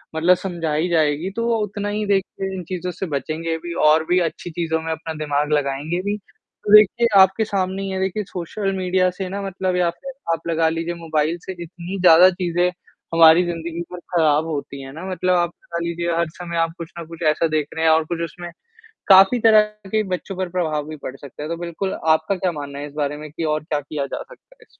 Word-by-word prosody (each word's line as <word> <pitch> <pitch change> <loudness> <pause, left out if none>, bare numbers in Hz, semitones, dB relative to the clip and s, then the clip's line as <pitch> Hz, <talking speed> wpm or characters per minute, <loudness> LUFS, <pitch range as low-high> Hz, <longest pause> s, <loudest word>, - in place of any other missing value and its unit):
मतलब 170 +3 +4
समझाई 170 -3 -2
जाएगी, 160 +1 +1
तो 230 0 -1 0.2
उतना 205 0 -4
ही 210 +1 -2
देखिए 195 -1 -1
इन 185 - -5
चीज़ों 180 -1 -3
से 180 +2 -5
बचेंगे 160 +4 -2
भी 170 -1 -5
और 155 +1 +5
भी 180 +1 +4
अच्छी 175 - -10
चीज़ों 160 -1 -1
में 160 0 -4
अपना 160 0 -4
दिमाग 145 0 0
लगाएँगे 145 +4 -1
भी। 205 +2 -2
तो 210 0 -6
देखिए 215 +3 +6
आपके 190 +3 +4
सामने 190 -2 -1
ही 195 - -3
है 190 0 -3
देखिए 190 +2 -1
सोशल 195 +3 -3
मीडिया 185 0 +2
से 185 +1 -5
ना 200 +2 -4
मतलब 190 -1 -2
या 180 -1 +2
फिर 270 +11 -8 0.2
आप 165 0 -5
लगा 165 -1 +2
लीजिए 165 +1 -3
मोबाइल 160 -1 -1
से - - -4
इतनी 180 +3 -7
ज़्यादा 180 +1 +8
चीज़ें 175 -1 0 0.5
हमारी 165 +1 +7
ज़िंदगी 170 0 -4
पर 180 - -7 0.2
ख़राब 155 -2 +3
होती 140 -3 -5
हैं 135 0 -9
ना। 160 - -8
मतलब 185 0 +1
आप 175 0 +1
लगा 170 - -5
लीजिए 170 0 -2
हर 170 -1 +1
समय 170 -1 -4
आप 165 0 +1
कुछ 170 -1 -8
न 170 - -6
कुछ 165 0 -11
ऐसा 160 +2 +1
देख 155 -2 0
रहे 160 0 0
हैं 160 - +6
और 160 0 +4
कुछ 170 - -4
उसमें 175 +2 -9 0.6
काफ़ी 195 +5 +7
तरह 220 -1 +7 0.3
के 215 0 +2
बच्चों 195 +2 -8
पर 185 -1 -2
प्रभाव 155 -4 -1
भी 155 - -6
पड़ 130 - -5
सकता 140 +1 -10
है। 150 - -5
तो 170 - -3
बिल्कुल 175 +3 -3
आपका 160 +4 +3
क्या 185 -1 -1
मानना 145 -3 -7
है 145 - -5
इस 145 - -14
बारे 145 0 -1
में 155 0 -8
कि 165 - -5
और 155 -1 0
क्या 155 -1 -1
किया 145 0 -4
जा 140 - -5
सकता - - -19
है - - -48
इसमें? - - -18
170 Hz, 225 wpm, -21 LUFS, 160-185 Hz, 0.6 s, ज़्यादा